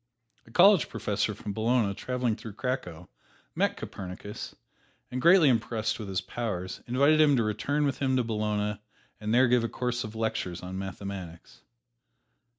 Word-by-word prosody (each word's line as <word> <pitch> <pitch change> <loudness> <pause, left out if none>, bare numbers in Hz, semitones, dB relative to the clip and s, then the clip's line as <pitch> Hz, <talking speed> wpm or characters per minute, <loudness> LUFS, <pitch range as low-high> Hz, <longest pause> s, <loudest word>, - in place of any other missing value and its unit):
A - - -15
college 190 - +6
professor 105 +1 -1
from 105 0 -6
Bologna 110 -1 +1
traveling 125 +1 -1
through 110 -1 -9
Cracow 90 -11 -4 0.5
met - - 0
Copernicus, 95 +2 -7 0.6
and 125 0 -3
greatly 170 0 +7
impressed 115 -3 0
with 105 - -6
his 95 -1 -1
powers, 95 -4 -4
invited 140 +5 +4
him 145 -2 +5
to 120 - +2
return 140 +7 0
with 140 - -1
him 130 -2 +1
to 125 - +2
Bologna 105 -2 -1 0.4
and 105 0 -3
there 125 +2 +5
give 120 -1 +3
a 115 - -1
course 125 0 -2
of 110 +1 -8
lectures 95 -6 -2
on 95 +1 -5
mathematics. 95 -2 -7
110 Hz, 155 wpm, -28 LUFS, 100-125 Hz, 0.6 s, greatly